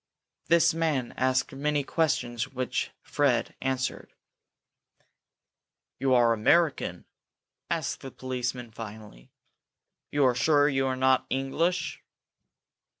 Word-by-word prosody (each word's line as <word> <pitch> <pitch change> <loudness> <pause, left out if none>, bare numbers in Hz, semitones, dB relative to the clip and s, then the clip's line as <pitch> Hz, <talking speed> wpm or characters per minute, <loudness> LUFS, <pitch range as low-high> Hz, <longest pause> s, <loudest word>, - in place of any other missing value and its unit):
This 170 -1 +4
man 155 -7 0
asked 130 0 +1
many 145 +1 0
questions 135 -6 0
which 130 -1 -2
Fred 140 -5 +1
answered. 130 -1 -3 1.8
"You 130 0 +3
are 120 -1 +5
American?" 150 +8 +2 0.6
asked - - -2
the 135 - -7
policeman, 125 -2 -4
finally. 105 - -10 0.8
"You 145 -2 +3
are 125 - +4
sure 145 +4 +3
you 135 -2 +1
are 130 - 0
not 130 0 +3
English?" 155 +7 -1
130 Hz, 100 wpm, -27 LUFS, 125-145 Hz, 1.8 s, are